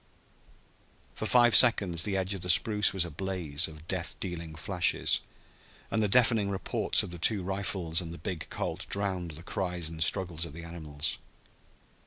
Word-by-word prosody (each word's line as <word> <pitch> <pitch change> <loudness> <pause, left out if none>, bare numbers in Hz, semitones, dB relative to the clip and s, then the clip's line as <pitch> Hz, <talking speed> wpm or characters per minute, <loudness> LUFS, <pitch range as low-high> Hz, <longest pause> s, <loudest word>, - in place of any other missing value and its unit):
For - - -5
five 120 -1 +4
seconds 100 -9 +6
the 100 +1 -1
edge 95 +1 -1
of 95 - -7
the 90 - -6
spruce 105 +3 +4
was 95 -3 0
a 85 - -8
blaze 85 -3 -1
of 80 0 -14
death 85 -2 -2
dealing 85 -4 -6
flashes, 85 +2 +1 0.7
and 110 - 0
the 105 - +2
deafening 115 -2 +3
reports 95 -1 0
of - - -8
the 85 - -9
two 100 +2 +1
rifles 95 -3 -2
and 85 -2 -8
the 85 - -8
big 85 +1 -6
Colt - - -4
drowned 95 -3 -1
the 80 +3 -9
cries 90 -3 -3
and 80 0 -1
struggles 85 -2 +1
of 85 -4 -6
the 85 +2 -9
animals. 80 -3 -4
90 Hz, 175 wpm, -29 LUFS, 85-100 Hz, 0.7 s, seconds